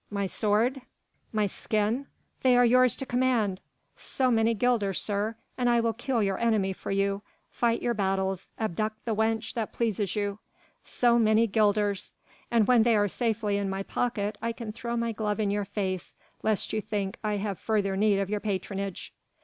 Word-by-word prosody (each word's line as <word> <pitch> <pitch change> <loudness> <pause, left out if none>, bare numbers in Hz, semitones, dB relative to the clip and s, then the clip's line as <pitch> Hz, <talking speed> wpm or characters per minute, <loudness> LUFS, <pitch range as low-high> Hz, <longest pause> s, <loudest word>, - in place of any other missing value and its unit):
My 200 -1 -1
sword, 220 +7 +1 0.5
my 215 -1 +1
skin, 215 +6 -1 0.3
they 255 -2 +5
are 245 - +6
yours 250 0 +5
to 270 - -5
command! 245 -7 +1 0.4
so 255 -1 0
many 225 0 +3
guilders, 215 -5 +1
sir, 210 +2 -1 0.2
and 245 -1 +2
I 240 0 +4
will 230 -1 +1
kill 240 -1 -1
your 195 -1 0
enemy 215 -5 +2
for - - -8
you, 195 0 0 0.3
fight 235 -1 0
your 240 - +1
battles, 190 -2 -1
abduct 215 +1 -2
the 230 - 0
wench 220 +1 0
that 225 -3 -3
pleases 215 -4 -1
you. 205 -1 -2 0.4
So 240 -1 +2
many 220 0 +4
guilders! 205 -2 +1 0.4
and 230 -3 +3
when 245 0 +5
they 230 0 +4
are 205 -1 +3
safely 220 -1 0
in 200 -1 -1
my 195 0 -2
pocket 210 -2 -2
I 230 +1 -1
can 230 -2 -6
throw 235 +2 -4
my 235 0 0
glove 210 -1 -2
in 205 -2 +1
your 205 0 -1
face 190 -2 -3 0.3
lest 215 -2 0
you 215 - 0
think 200 -2 -3
I 210 -1 0
have 200 -2 -2
further 205 -3 0
need 205 0 +3
of 195 -1 0
your 210 +1 -1
patronage." 195 -1 -4
215 Hz, 180 wpm, -28 LUFS, 200-230 Hz, 0.5 s, are